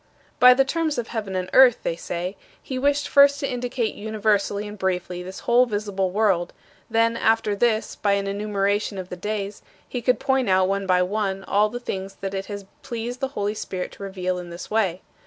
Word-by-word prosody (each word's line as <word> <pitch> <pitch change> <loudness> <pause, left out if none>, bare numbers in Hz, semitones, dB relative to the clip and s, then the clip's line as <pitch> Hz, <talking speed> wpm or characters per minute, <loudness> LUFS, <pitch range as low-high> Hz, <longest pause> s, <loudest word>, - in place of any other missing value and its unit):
"By 250 0 +9
the 270 +1 +4
terms 315 0 -1
of 235 -2 -3
heaven 210 -5 -4
and 185 0 -1
earth," 255 -3 +6
they 165 - -1
say, 175 +3 -4 0.2
"he 260 -1 -5
wished 285 +2 +1
first 280 0 +6
to 275 - 0
indicate 245 -2 -2
universally 210 -1 0
and 210 - -7
briefly 180 -2 -2
this 185 +1 -8
whole 245 +1 +4
visible 205 -3 -1
world; 190 -3 +1 0.4
then 230 0 +2
after 225 -2 +2
this, 220 +1 +1
by 200 -1 +2
an 200 0 0
enumeration 200 0 -1
of 185 -1 -6
the - - -5
days, 205 +2 -4 0.3
he 245 - -4
could 250 +2 +2
point 265 -4 +1
out, 185 0 +4
one 195 0 -1
by 180 -1 +4
one, 195 0 -2
all 210 +2 +2
the 245 +3 -5
things 195 -4 -5
that 195 0 -3
it 195 0 -4
has 200 -1 -6 0.2
pleased 240 0 -5
the 270 - 0
Holy 205 +1 0
Spirit 185 -3 -5
to - - -14
reveal 185 -2 -3
in 175 -1 -8
this 170 +4 -9
way. 195 -5 0
205 Hz, 205 wpm, -24 LUFS, 190-235 Hz, 0.4 s, By